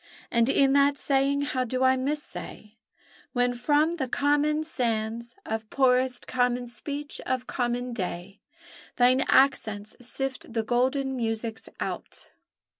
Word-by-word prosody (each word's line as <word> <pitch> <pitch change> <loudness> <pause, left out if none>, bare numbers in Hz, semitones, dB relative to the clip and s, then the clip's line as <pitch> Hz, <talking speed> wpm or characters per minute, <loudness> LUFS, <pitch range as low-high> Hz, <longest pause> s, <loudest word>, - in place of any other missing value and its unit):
And 235 +1 +3
in 275 0 +4
that 280 0 +4
saying 275 0 +1
how 260 -3 -1
do 255 +1 -1
I 260 0 +5
missay, 270 -5 -5 0.6
When 245 -1 +2
from 295 +7 +2
the 265 -5 -2
common 295 +3 +1
sands 235 -5 -2
Of 220 0 -4
poorest 255 -1 +2
common 245 -1 0
speech 285 +4 -5
of 255 -1 -1
common 245 0 -2
day 190 -1 -5 0.5
Thine 255 +2 +4
accents 215 -6 +2
sift 260 0 -3
the 225 -1 0
golden 260 +3 +1
musics 225 -1 -2
out! - - -6
255 Hz, 125 wpm, -27 LUFS, 235-275 Hz, 0.6 s, I